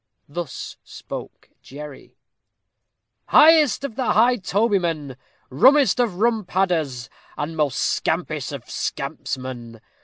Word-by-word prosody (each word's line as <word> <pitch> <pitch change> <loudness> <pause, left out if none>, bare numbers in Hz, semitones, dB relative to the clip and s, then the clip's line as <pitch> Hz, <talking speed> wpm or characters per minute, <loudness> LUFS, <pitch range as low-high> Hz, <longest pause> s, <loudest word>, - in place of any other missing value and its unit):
Thus 150 -2 -6
spoke - - -10
Jerry: 145 0 -11 1.1
"Highest 305 -5 +6
of 260 -6 -5
High 245 -1 +3
Tobymen! 180 - -1 0.4
rummest 260 - +5
of 235 -7 +1
rum 225 +2 +1
Padders, 165 -10 -1 0.3
and 150 +2 -4
most 150 -4 0
scampish - - -1
of - - -7
Scampsmen! 120 -3 -5
175 Hz, 95 wpm, -22 LUFS, 140-235 Hz, 1.1 s, Highest